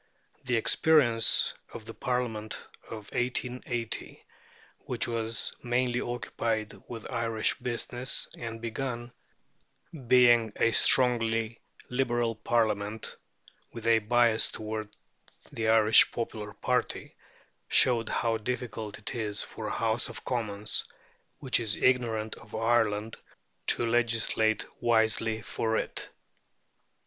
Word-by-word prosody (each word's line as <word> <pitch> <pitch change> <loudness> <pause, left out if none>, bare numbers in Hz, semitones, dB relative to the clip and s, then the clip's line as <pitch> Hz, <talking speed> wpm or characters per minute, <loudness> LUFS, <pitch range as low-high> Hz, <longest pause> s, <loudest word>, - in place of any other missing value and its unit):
The 125 -1 +1
experience 120 -2 +4 0.2
of 110 - -8
the 115 - -7
Parliament 115 -4 -3 0.2
of 110 -2 -9
1880, 120 -1 -3 0.5
which - - -2
was 115 -1 -2
mainly 120 0 0
occupied 110 -2 -3
with 115 -2 -8
Irish 115 -3 0
business, 125 +1 -1
and 115 -1 -6
began, 120 +1 -4 1.0
being 120 -3 +5
a 115 - +2
strongly 115 -2 +3 0.3
Liberal 120 -2 0
Parliament, 110 -1 -1 0.6
with 115 -1 -8
a 115 -1 +5
bias 115 0 +3
toward 110 -1 -5 0.6
the 110 -1 -1
Irish 110 0 +6
popular 110 -3 -5
party, - - -2 0.5
showed 120 -3 +3
how 115 -1 0
difficult 110 -2 -4
it 105 - -5
is 105 -3 -2
for 110 - -7
a - - -3
House 115 +1 0
of - - -9
Commons 105 -4 -2 0.5
which 130 -3 +1
is 110 -3 -1
ignorant 115 -4 +1
of 110 - -11
Ireland 110 -1 +1 0.5
to 120 - +4
legislate 115 -2 +1 0.2
wisely 110 -1 +1
for 110 0 -1
it. - - -4
115 Hz, 110 wpm, -29 LUFS, 110-120 Hz, 1.0 s, Irish